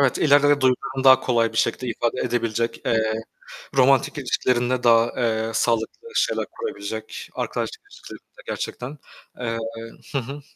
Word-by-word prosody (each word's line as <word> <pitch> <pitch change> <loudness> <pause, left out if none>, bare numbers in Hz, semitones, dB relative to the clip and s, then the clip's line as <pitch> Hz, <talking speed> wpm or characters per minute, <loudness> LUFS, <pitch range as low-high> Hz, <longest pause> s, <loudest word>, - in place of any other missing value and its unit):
Evet, 135 -3 +3
ileride 145 -1 +5
duygularını 130 +1 0
daha 130 -1 +8
kolay 115 -3 +1
bir - - -8
şekilde 130 - 0
ifade 120 0 -1
edebilecek, 115 -1 -1
eee, 110 -1 +1 0.6
romantik 135 +1 +4
ilişkilerinde 125 -1 0
daha, 115 0 +5
eee, 110 -1 0
sağlıklı 115 - -1
şeyler - - +1
kurabilecek, 455 -3 -6
arkadaşlık 440 - -3
ilişkilerinde, - - -13
gerçekten, 135 +5 -5 0.4
eee 115 -2 -2 0.5
Hı 140 - -1
hı. 135 +3 -5
125 Hz, 130 wpm, -23 LUFS, 115-135 Hz, 0.6 s, daha